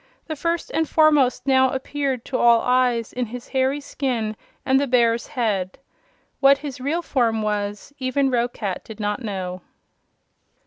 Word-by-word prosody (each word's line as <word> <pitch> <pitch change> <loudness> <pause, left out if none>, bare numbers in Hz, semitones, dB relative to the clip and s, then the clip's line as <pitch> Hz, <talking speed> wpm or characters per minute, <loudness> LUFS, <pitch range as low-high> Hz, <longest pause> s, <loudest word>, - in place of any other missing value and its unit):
The 315 - -4
First 335 +3 -2
and 320 -1 0
Foremost 300 -6 +3
now 260 -1 +4
appeared 265 -1 -3
to 255 - -2
all 235 -1 +5
eyes 250 -2 +1
in 250 -1 -2
his 245 +2 -9
hairy 265 +1 +1
skin 245 -7 -2 0.3
and 265 0 +4
the 285 - 0
bear's 235 -2 +2
head. 210 -9 -2 0.6
What 275 0 +6
his 280 -3 -7
real 320 +6 -1
form 230 -7 +1
was 205 +3 -3
even 265 +1 +1
Roquat 235 -6 -2
did 220 -1 -11
not 210 +2 -2
know. 185 -5 -4
250 Hz, 150 wpm, -22 LUFS, 225-275 Hz, 0.6 s, What